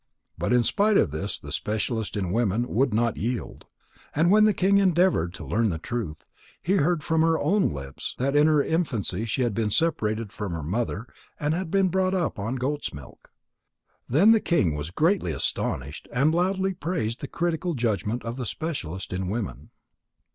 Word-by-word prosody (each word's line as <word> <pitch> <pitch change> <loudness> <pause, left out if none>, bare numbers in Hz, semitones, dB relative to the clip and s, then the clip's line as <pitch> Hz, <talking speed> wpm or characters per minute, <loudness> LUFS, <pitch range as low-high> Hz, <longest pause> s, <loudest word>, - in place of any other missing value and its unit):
But - - -2
in 125 -1 +4
spite 205 - +3
of 75 - +3
this 95 +7 -3
the 75 - -10
specialist 110 +3 -2
in 95 -3 -2
women 115 +2 +1
would 130 +2 +1
not 115 +1 +1
yield. 120 +2 -4 0.5
And 165 +4 +3
when 215 +1 +6
the 215 - +5
king 195 +2 +4
endeavoured 180 - +3
to - - -8
learn 115 0 +1
the 85 - -2
truth, 85 -4 -5 0.3
he 195 +3 +1
heard 160 0 +1
from 160 +1 +1
her 165 0 +3
own 190 +8 +2
lips 70 -1 -6
that 135 +3 0
in 150 +1 +6
her 150 -2 +4
infancy 130 - -1
she 115 +3 0
had 120 -3 0
been 110 0 0
separated 110 -6 0
from 100 -4 -4
her 80 -2 -4
mother 110 +6 -2 0.3
and 150 +1 0
had 180 0 -2
been 195 +1 +3
brought 190 +1 +1
up 170 - -1
on 110 +6 -2
goat's 135 - -2
milk. 70 -2 -13 0.8
Then 170 - +6
the 225 - +6
king 105 - +1
was 75 +1 -4
greatly 160 - +1
astonished 70 +1 -3
and 140 +6 +2
loudly 190 +2 +1
praised 150 -11 -3
the 140 - -4
critical 170 +1 -1
judgment 115 -1 -1
of 115 +2 -4
the 125 -3 -3
specialist 95 - -4
in 95 0 -2
women. 110 0 -4
125 Hz, 185 wpm, -26 LUFS, 105-170 Hz, 0.8 s, when